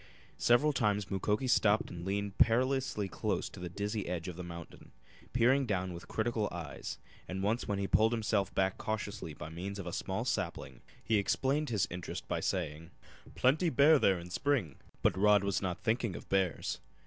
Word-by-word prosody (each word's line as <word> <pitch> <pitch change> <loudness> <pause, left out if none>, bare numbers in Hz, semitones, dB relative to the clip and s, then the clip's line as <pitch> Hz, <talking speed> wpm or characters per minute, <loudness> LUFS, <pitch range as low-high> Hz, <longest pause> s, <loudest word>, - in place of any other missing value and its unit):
Several 140 +6 +4
times 105 -6 0
Mukoki 105 +5 0
stopped 110 -3 +3
and 85 -1 -7
leaned 100 +1 -2
perilously 125 -3 +2
close - - -2
to - - -11
the 90 0 -5
dizzy 105 +3 -3
edge 85 -1 -3
of 90 - -5
the 90 - -6
mountain, 85 -1 -9 0.4
peering 130 +3 +3
down 95 -3 -1
with 85 +1 -9
critical 110 -1 -1
eyes, 80 -7 -6 0.3
and 95 +1 -4
once 110 +4 0
when 100 -2 0
he 100 - -1
pulled 110 +3 +4
himself 105 -4 0
back 95 -1 +1
cautiously 105 -6 -4
by 75 - -7
means 95 +5 -5
of 100 - -6
a 85 - -5
small - - -2
sapling - - -3 0.2
he 110 - +2
explained 140 +8 +1
his 105 -5 +1
interest 90 0 -6
by - - -1
saying: 80 +3 -2 0.5
"Plenty 155 +7 +3
bear 145 +2 +6
there 95 -6 +4
in 85 +1 -9
spring!" 120 - 0 0.3
But - - +4
Rod 105 +1 +5
was 100 -1 0
not 90 -2 -3
thinking 115 -4 0
of - - -9
bears. 95 -10 0
100 Hz, 185 wpm, -32 LUFS, 90-115 Hz, 0.5 s, bear